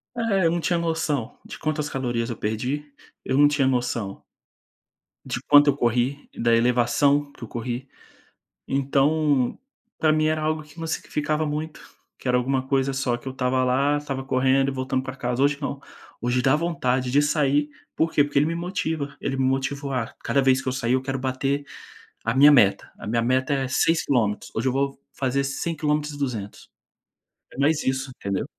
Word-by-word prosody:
É, 205 -6 +1
eu 165 - +4
não 170 - 0
tinha 170 +1 0
noção 160 -7 -2
de - - -9
quantas 150 -1 -2
calorias 120 -3 -2
eu 115 - -4
perdi, 130 +7 -3 0.3
eu 130 - 0
não 145 +1 +6
tinha 145 -2 +1
noção 120 -6 -2 1.0
de 125 -2 -3
quanto 145 0 +7
eu 140 - +2
corri, 125 +3 0
da 115 0 +2
elevação 125 +5 +2
que 120 - -13
eu - - -6
corri. 120 +3 -5 0.8
Então, 140 0 +1 0.4
para 155 -1 +3
mim 155 0 +2
era 155 0 +1
algo 155 0 0
que 150 +2 -15
me 165 - -4
significava 155 -1 -1
muito, 150 +1 -4 0.4
que - - -7
era 125 - +3
alguma 130 +1 -1
coisa 135 0 +1
só 130 -2 0
que 120 - -12
eu - - -2
estava 130 0 0
lá, 135 +3 +2
estava 135 -2 -4
correndo 135 +1 +2
e - - -2
voltando 130 0 -2
para 130 0 -6
casa. 125 0 -2
Hoje 140 0 +3
não, 140 -1 -4 0.4
hoje 125 +1 +1
dá 130 +2 +4
vontade 130 -6 0
de 145 +3 +4
sair. 145 0 +1 0.3
"Por 160 +1 +1
quê?" 145 - +4
Porque 145 - -3
ele 150 - +3
me 165 - -1
motiva, 160 -5 -3
ele 135 - -2
me 135 - +1
motiva. 135 +1 -1
"Ah, - - -11
cada 140 - +2
vez 130 0 +3
que - - -10
eu 130 - 0
sair 125 -2 0
eu 130 - +2
quero 135 0 -3
bater 135 +2 -1 0.6
a 115 - 0
minha 145 +3 +8
meta. 100 -8 +4
A - - -8
minha 115 +2 +1
meta 130 +3 +1
é 135 -1 0
6 165 +5 +2
quilômetros, 110 -6 0
hoje - - -1
eu - - +3
vou 135 0 -1 0.2
fazer 135 +1 0
5 145 +4 -3
quilômetros 150 0 0
e - - -8
200". 115 -8 -5 0.8
É - - -13
mais 145 +2 +2
isso, 130 0 -1
entendeu? 100 -1 -2
135 Hz, 195 wpm, -24 LUFS, 125-150 Hz, 1.0 s, minha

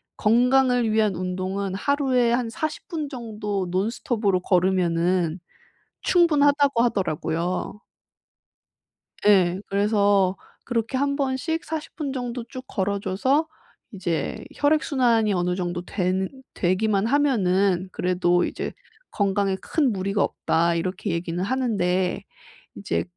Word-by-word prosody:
건강을 245 +1 +3
위한 215 -3 +2
운동은 185 +2 -3
하루에 255 0 +1
한 240 -1 0
40 310 +4 -4
분 315 -4 -3
정도 210 -6 -4
논스톱으로 200 +1 0
걸으면은 180 -2 +1 0.6
충분하다."고 290 -7 +3
하더라고요. 180 -2 -2 1.5
예. 185 -3 +4
그래서 200 -2 +2 0.3
그렇게 230 0 -2
1 280 +1 +1
번씩 280 +4 -1
40 315 -1 -5
분 290 -5 -3
정도 245 -2 -4
쭉 255 - -7
걸어 200 +1 -1
줘서 260 +12 +1 0.5
이제 175 -4 -3
혈액순환이 255 -7 +2
어느 180 -1 0
정도 175 -1 -3
되는 185 0 -1 0.2
되기만 195 +3 +1
하면은 195 -9 +2
그래도 180 -1 +1
이제 - - -4 0.4
"건강에 200 -1 +1
큰 290 -6 +1
무리가 195 +1 0
없다." 170 +1 +1
이렇게 185 +3 -2
얘기는 170 +1 -3
하는데 190 -7 0 0.5
이제 85 - -2
200 Hz, 245 characters per minute, -24 LUFS, 185-255 Hz, 1.5 s, 예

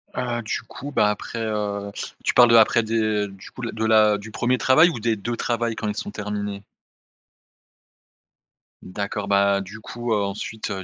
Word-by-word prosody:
Heu, 120 -1 -2
du 110 - -3
coup, 140 +4 -9
bah 105 -6 +3
après, 115 +2 -4
heu 105 -2 -2 0.3
tu - - +1
parles 120 -1 +7
de 115 - +6
après 115 +1 +6
des 110 -2 0
du 95 -1 -13
coup, 130 - -10
la 115 - -3
de 110 0 -2
la 110 -1 +5
du 105 +2 -10
1er 125 +3 +1
travail 155 +8 +5
ou 120 - -5
des 115 0 +1
2 120 +4 -4
travails, 115 -1 -1
quand 110 - -4
ils 105 - -2
sont 105 - -5
terminés? 105 -1 -4 2.2
D'accord, 100 +2 -4
bah 100 0 +3
du 100 +3 -9
coup, 120 +1 -3
heu, 105 - +1
ensuite, 105 +2 -4
heu, 95 -1 -4
110 Hz, 190 wpm, -23 LUFS, 100-115 Hz, 2.2 s, parles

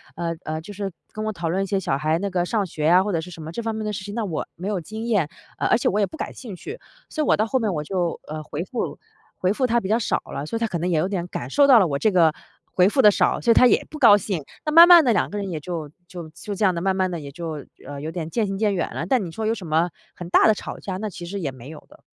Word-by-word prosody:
呃， 170 -1 -3
呃， 155 0 -3
就 205 +5 -10
是 200 -1 -4 0.2
跟 215 - -4
我 215 - -1
讨 170 -4 -4
论 190 +3 0
一 - - -2
些 195 +1 0
小 135 -7 -1
孩 155 +3 +1
那 200 +2 -2
个 180 -2 0
上 205 +1 0
学 155 -3 -4
呀， 180 +4 +5
或 205 - -2
者 165 - 0
是 180 +2 -9
什 165 - -10
么 155 +1 -7
这 235 - -3
方 225 0 -2
面 220 0 -4
的 210 - -2
事 190 - -5
情， 205 - -7
那 230 - -1
我 170 -6 -3
没 180 +4 -6
有 200 -4 -1
经 220 +6 -7
验， 205 -10 +1 0.3
呃， - - 0
而 235 - +4
且 - - -1
我 205 - +1
也 200 - +4
不 315 - -11
感 - - -5
兴 220 -7 -9
趣。 420 - -8 0.3
所 310 - -2
以 - - -2
我 - - +4
到 215 - +2
后 260 +3 0
面 215 -4 0
我 150 -2 -2
就 175 0 -2
呃， 155 0 -5
回 150 +2 -5
复 235 +5 -4 0.4
回 185 - +1
复 255 +3 0
她 235 0 +2
比 190 - -5
较 220 - +3
少 - - 0 0.2
了。 140 - -4
所 230 - -3
以 - - -4
她 230 - 0
可 180 -5 -3
能 175 +3 -1
也 170 - +1
有 175 - +1
点 180 -3 -3
感 125 -6 -6
受 280 - +4
到 260 -4 +8
了 190 - +3
我 140 -1 -2
这 215 - +2
个 165 -4 +4 0.3
回 180 0 +3
复 265 - +3
得 210 -3 +7
少， - - +1
所 235 - +3
以 - - +8
她 250 - +6
也 - - +2
不 305 - -9
高 210 -6 +8
兴。 190 -6 -3 0.2
那 305 - 0
慢 335 +2 +10
慢 345 -2 +9
地， 240 - +4
两 210 - +1
个 205 - -5
人 200 -2 -3
也 160 -3 -4
就 160 -2 -5 0.2
就 175 -3 -8
就 200 +5 -7
这 210 - +1
样 185 - +3
的 170 - -3
慢 190 0 +1
慢 185 -1 +1
地 170 - -4
也 140 -2 -8
就 160 -2 -6 0.2
呃， 140 -1 -7
有 155 +2 -4
点 165 -2 -5
渐 220 +6 0
行 195 0 -3
渐 210 -1 +1
远 175 - -2
了。 165 - -3
但 245 +1 +2
你 165 - -7
说 220 +5 -4
有 220 - +2
什 195 -6 -7
么 160 +3 +2 0.3
很 175 -1 -8
大 - - +5
的 220 - +6
吵 - - -7
架， 190 -2 -5
那 215 +2 -4
其 175 -1 -8
实 200 +3 -5
也 145 -6 -3
没 130 +1 -12
有 155 -1 -11
的。 - - -19
190 Hz, 360 characters per minute, -23 LUFS, 165-215 Hz, 0.4 s, 慢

